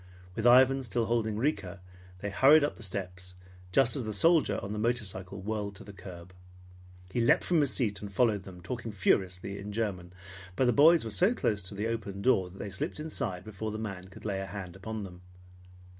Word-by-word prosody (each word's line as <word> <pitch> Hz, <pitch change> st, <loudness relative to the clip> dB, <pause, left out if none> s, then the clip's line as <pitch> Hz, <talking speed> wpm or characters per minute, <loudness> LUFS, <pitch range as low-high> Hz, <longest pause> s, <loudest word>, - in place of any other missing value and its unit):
With 115 Hz, +1 st, +1 dB
Ivan 130 Hz, +2 st, +6 dB
still 120 Hz, -1 st, -1 dB
holding 110 Hz, -2 st, 0 dB
Rika, 100 Hz, -, -2 dB, 0.4 s
they 100 Hz, -, -3 dB
hurried 145 Hz, +8 st, +6 dB
up 145 Hz, -, -1 dB
the -, -, -14 dB
steps 90 Hz, -2 st, -6 dB, 0.4 s
just 120 Hz, +6 st, +4 dB
as 135 Hz, -, -1 dB
the 110 Hz, -1 st, -4 dB
soldier 165 Hz, -, +3 dB
on 100 Hz, +1 st, -4 dB
the 105 Hz, -, -3 dB
motorcycle 100 Hz, -5 st, -2 dB
whirled 105 Hz, 0 st, -3 dB
to -, -, -8 dB
the 100 Hz, -, -11 dB
curb. 90 Hz, -1 st, -11 dB, 0.8 s
He 120 Hz, -, 0 dB
leaped 115 Hz, -, +4 dB
from 175 Hz, -3 st, +2 dB
his 145 Hz, -3 st, +2 dB
seat 105 Hz, -6 st, -1 dB
and 100 Hz, -1 st, -7 dB
followed 110 Hz, -2 st, +2 dB
them, 90 Hz, -2 st, -12 dB
talking 115 Hz, +5 st, -5 dB
furiously 95 Hz, 0 st, 0 dB
in 100 Hz, +1 st, -7 dB
German, 100 Hz, -5 st, -3 dB, 0.4 s
but 130 Hz, -, +2 dB
the 125 Hz, -, +3 dB
boys 155 Hz, +1 st, +6 dB
were 110 Hz, -, -5 dB
so 185 Hz, -, +3 dB
close 105 Hz, -, 0 dB
to 95 Hz, +2 st, -5 dB
the 105 Hz, +2 st, -2 dB
open 105 Hz, -4 st, -4 dB
door 95 Hz, -8 st, +3 dB
that 95 Hz, -, -14 dB
they 100 Hz, -, -6 dB
slipped 95 Hz, -, -4 dB
inside 130 Hz, -, -3 dB
before 110 Hz, +1 st, -5 dB
the 110 Hz, -, -4 dB
man 100 Hz, -4 st, -6 dB
could 95 Hz, -, -14 dB
lay 100 Hz, -2 st, -1 dB
a 95 Hz, -, -5 dB
hand 95 Hz, -2 st, -7 dB
on 110 Hz, -1 st, -4 dB
them. 90 Hz, -2 st, -10 dB
105 Hz, 210 wpm, -30 LUFS, 95-120 Hz, 0.8 s, Ivan